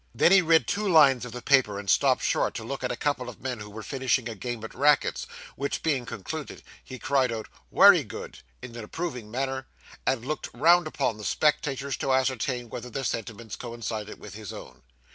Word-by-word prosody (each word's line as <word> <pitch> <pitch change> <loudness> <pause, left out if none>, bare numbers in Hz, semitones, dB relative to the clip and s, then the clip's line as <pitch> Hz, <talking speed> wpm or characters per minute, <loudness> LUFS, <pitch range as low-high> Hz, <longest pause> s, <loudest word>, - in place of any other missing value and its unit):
Then, - - +5
he 195 -1 +7
read 165 -1 +4
two 210 +1 -1
lines 140 -7 +6
of 125 - -8
the 125 +1 -8
paper, 130 -7 +3
and 100 0 -7
stopped - - +3
short - - +1
to - - -4
look 135 +3 -5
at 125 - -1
a - - -2
couple 130 -2 -1
of 120 - -11
men 130 -3 -4
who 105 0 -8
were 110 +1 -8
finishing 130 0 0
a 115 - -4
game 120 +1 -5
at 110 - -7
rackets, 145 +2 +2 0.3
which, 140 0 -3
being 135 -7 0
concluded, 150 +10 -6 0.2
he 130 - -9
cried 130 -2 +1
out 110 -1 -5 0.2
'wery 195 -6 +7
good,' 105 - -9 0.2
in 120 -2 -8
an 115 - -6
approving 125 -3 -5
manner, 130 +2 -3 0.4
and 130 -3 +1
looked 155 +3 -3
round 175 0 +5
upon 135 -7 -1
the - - -8
spectators, 140 0 0
to 135 - -1
ascertain 130 -1 0
whether 125 +2 -7
their 135 +3 -4
sentiments 115 -2 -4
coincided 115 -3 -6
with 105 - -10
his 105 -1 -8
own. 65 -1 -11
125 Hz, 205 wpm, -27 LUFS, 115-140 Hz, 0.4 s, he